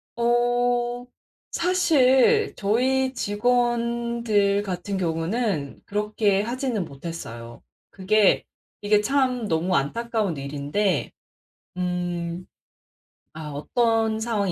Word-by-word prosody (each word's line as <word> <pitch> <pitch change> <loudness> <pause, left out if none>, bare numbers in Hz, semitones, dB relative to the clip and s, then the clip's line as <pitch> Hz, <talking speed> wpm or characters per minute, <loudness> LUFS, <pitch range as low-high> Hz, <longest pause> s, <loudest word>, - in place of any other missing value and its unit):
어 240 0 +1 0.5
사실 345 - +3
저희 260 +6 +1
직원들 235 -2 +1
같은 190 0 -4
경우는 165 - -2
그렇게 210 -1 0
하지는 240 -3 -2
못했어요. 135 -6 -8 0.3
그게 205 +2 +2 0.4
이게 210 0 +3
참 255 -1 0
너무 165 +3 0
안타까운 210 +4 -1
일인데 145 +6 -1 0.7
음 175 -1 -3 0.9
아 155 -1 -7
어떤 225 - 0
상황이 220 -4 -1
210 Hz, 180 characters per minute, -24 LUFS, 180-240 Hz, 0.9 s, 사실